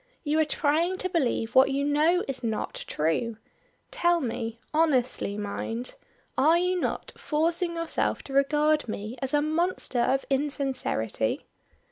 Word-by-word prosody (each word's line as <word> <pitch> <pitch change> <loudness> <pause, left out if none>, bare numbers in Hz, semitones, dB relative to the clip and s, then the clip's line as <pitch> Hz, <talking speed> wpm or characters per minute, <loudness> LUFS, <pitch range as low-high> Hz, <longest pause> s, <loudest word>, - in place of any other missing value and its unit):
You 305 0 +1
are 315 - +4
trying 310 +5 +1
to 370 - -1
believe 255 -9 0
what 260 +1 +6
you 280 +1 0
know 310 +5 +3
is 265 -2 -5
not 220 -2 -3
true. 185 +9 -1 0.5
Tell 345 -9 +2
me 230 -4 -3 0.2
honestly 260 -9 +2
mind 225 +4 -3 0.4
are 310 +6 +5
you 360 +1 +1
not - - -3
forcing 335 +3 0
yourself 335 0 -1
to 270 - -9
regard 295 +1 +3
me 215 +2 -5
as 265 -1 -2
a 295 0 +2
monster 315 -4 0
of 265 +3 +2
insincerity?" 270 - -1
285 Hz, 140 wpm, -27 LUFS, 245-330 Hz, 0.5 s, what